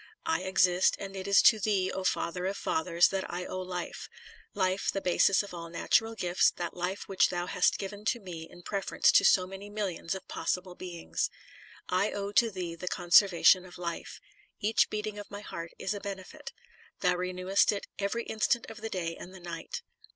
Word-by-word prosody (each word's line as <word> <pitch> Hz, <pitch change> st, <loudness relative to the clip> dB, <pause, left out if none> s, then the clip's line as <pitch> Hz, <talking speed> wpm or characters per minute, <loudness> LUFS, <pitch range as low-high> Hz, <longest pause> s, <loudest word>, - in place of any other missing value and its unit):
I 325 Hz, -, +1 dB
exist, 185 Hz, -1 st, +3 dB
and 195 Hz, 0 st, -7 dB
it 190 Hz, 0 st, -5 dB
is 200 Hz, 0 st, +6 dB
to 220 Hz, -, +7 dB
Thee, 195 Hz, -2 st, +1 dB
O 190 Hz, -, -4 dB
Father 180 Hz, 0 st, -1 dB
of 195 Hz, -, -3 dB
fathers, 170 Hz, +1 st, +2 dB
that 195 Hz, -1 st, -3 dB
I 180 Hz, +1 st, -4 dB
owe 185 Hz, -, -4 dB
life; 180 Hz, -1 st, -5 dB, 0.5 s
life 190 Hz, -1 st, +1 dB
the 195 Hz, -, -2 dB
basis 190 Hz, +2 st, +3 dB
of 200 Hz, -, -10 dB
all 170 Hz, -1 st, -7 dB
natural 225 Hz, +6 st, +1 dB
gifts, 180 Hz, -4 st, +3 dB
that 175 Hz, -1 st, -4 dB
life 180 Hz, +3 st, -3 dB
which 195 Hz, -, +3 dB
thou 175 Hz, -1 st, -2 dB
hast 180 Hz, -, +2 dB
given 200 Hz, +1 st, -6 dB
to 240 Hz, +2 st, +1 dB
me 170 Hz, -5 st, -8 dB
in 175 Hz, -, -14 dB
preference 195 Hz, 0 st, +2 dB
to -, -, +6 dB
so 185 Hz, -1 st, +5 dB
many 195 Hz, +2 st, -9 dB
millions 195 Hz, -4 st, -3 dB
of 190 Hz, -, -9 dB
possible 180 Hz, 0 st, -2 dB
beings. 175 Hz, -2 st, -3 dB, 0.6 s
I 185 Hz, +3 st, +1 dB
owe 200 Hz, 0 st, -3 dB
to 230 Hz, +2 st, +4 dB
thee 180 Hz, -4 st, -5 dB
the 170 Hz, +2 st, -8 dB
conservation 180 Hz, +1 st, +5 dB
of 180 Hz, -1 st, -12 dB
life. 170 Hz, -1 st, -5 dB, 0.4 s
Each 220 Hz, +2 st, +2 dB
beat 210 Hz, 0 st, -3 dB
ing 210 Hz, -1 st, -5 dB
of 205 Hz, -, -9 dB
my 205 Hz, 0 st, -7 dB
heart 170 Hz, -5 st, -7 dB
is 195 Hz, -, -2 dB
a 205 Hz, -, -5 dB
benefit. 200 Hz, +9 st, -7 dB, 0.5 s
Thou 180 Hz, -1 st, +3 dB
renewest 185 Hz, +2 st, +2 dB
it 205 Hz, -, -4 dB
every 205 Hz, +4 st, -1 dB
instant 230 Hz, +3 st, 0 dB
of 220 Hz, -, -11 dB
the 225 Hz, -, -4 dB
day 170 Hz, -4 st, -3 dB
and 185 Hz, +2 st, -10 dB
the -, -, -10 dB
night. 170 Hz, -2 st, -6 dB
190 Hz, 200 wpm, -30 LUFS, 180-200 Hz, 0.6 s, to